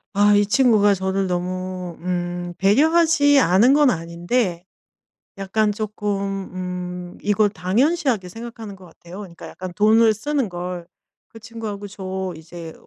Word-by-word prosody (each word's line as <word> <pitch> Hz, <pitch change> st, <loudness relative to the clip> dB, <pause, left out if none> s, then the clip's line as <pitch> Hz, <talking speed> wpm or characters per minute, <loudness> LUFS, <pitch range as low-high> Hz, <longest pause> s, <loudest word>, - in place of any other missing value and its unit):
아 205 Hz, +1 st, +5 dB
이 205 Hz, -, +3 dB
친구가 210 Hz, -3 st, +4 dB
저를 190 Hz, 0 st, -1 dB
너무 180 Hz, 0 st, -4 dB
음 175 Hz, 0 st, -3 dB
배려하지 290 Hz, -, +4 dB
않은 215 Hz, +6 st, +4 dB
건 295 Hz, -2 st, +5 dB
아닌데 175 Hz, +2 st, -2 dB, 0.7 s
약간 210 Hz, +2 st, 0 dB
쪼끔 200 Hz, -2 st, -3 dB
음 180 Hz, -1 st, -6 dB
이걸 205 Hz, 0 st, +2 dB
당연시하게 225 Hz, -, 0 dB
생각하는 225 Hz, 0 st, -9 dB
것 190 Hz, -1 st, -15 dB
같아요 175 Hz, +2 st, -12 dB
그러니까 180 Hz, -5 st, -10 dB
약간 185 Hz, -1 st, -8 dB
돈을 220 Hz, +1 st, +4 dB
쓰는 270 Hz, +1 st, -2 dB
걸. 175 Hz, -1 st, -6 dB, 0.4 s
그 225 Hz, -, -13 dB
친구하고 220 Hz, -2 st, -7 dB
저 190 Hz, -2 st, -5 dB
이제 165 Hz, 0 st, -10 dB
195 Hz, 275 characters per minute, -21 LUFS, 180-220 Hz, 0.7 s, 아